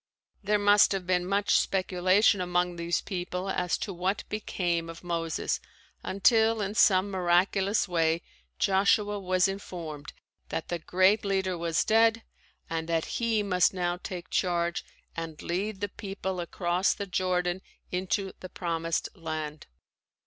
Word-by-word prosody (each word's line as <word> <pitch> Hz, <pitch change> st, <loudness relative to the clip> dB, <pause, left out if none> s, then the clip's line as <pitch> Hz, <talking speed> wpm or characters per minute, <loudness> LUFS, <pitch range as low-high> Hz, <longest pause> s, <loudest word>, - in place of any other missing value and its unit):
There 210 Hz, +1 st, +2 dB
must 205 Hz, 0 st, +5 dB
have 190 Hz, -2 st, -3 dB
been 180 Hz, 0 st, +1 dB
much 200 Hz, +1 st, +3 dB
speculation 185 Hz, +2 st, +2 dB
among 180 Hz, 0 st, 0 dB
these 170 Hz, 0 st, -1 dB
people 180 Hz, +1 st, -4 dB
as 180 Hz, -1 st, 0 dB
to 195 Hz, -, -4 dB
what 185 Hz, +3 st, -1 dB
became 175 Hz, -5 st, -2 dB
of 165 Hz, +1 st, -10 dB
Moses 165 Hz, -2 st, -2 dB, 0.4 s
until 220 Hz, +3 st, +3 dB
in 200 Hz, 0 st, -2 dB
some 200 Hz, -2 st, +4 dB
miraculous 190 Hz, +3 st, +2 dB
way 165 Hz, -1 st, +1 dB, 0.3 s
Joshua 205 Hz, +1 st, +2 dB
was 185 Hz, 0 st, +2 dB
informed 170 Hz, -6 st, -6 dB, 0.4 s
that 165 Hz, -, -4 dB
the 175 Hz, -, -2 dB
great 185 Hz, +6 st, +3 dB
leader 190 Hz, -2 st, 0 dB
was 170 Hz, -1 st, 0 dB
dead 225 Hz, +1 st, +4 dB, 0.4 s
and 165 Hz, 0 st, -3 dB
that 165 Hz, -1 st, +1 dB, 0.2 s
he 225 Hz, -2 st, +2 dB
must 185 Hz, -1 st, +2 dB
now 175 Hz, -1 st, -1 dB
take 180 Hz, -1 st, -7 dB
charge 175 Hz, -1 st, 0 dB, 0.3 s
and 165 Hz, -2 st, -6 dB
lead 195 Hz, +3 st, -2 dB
the 205 Hz, -, -1 dB
people 195 Hz, -2 st, -5 dB
across 175 Hz, +1 st, 0 dB
the 200 Hz, -, -4 dB
Jordan 185 Hz, -1 st, 0 dB, 0.3 s
into 190 Hz, +2 st, -1 dB
the 185 Hz, -, -8 dB
Promised 165 Hz, -2 st, -2 dB
Land. 155 Hz, -3 st, -5 dB
185 Hz, 140 wpm, -28 LUFS, 175-200 Hz, 0.4 s, must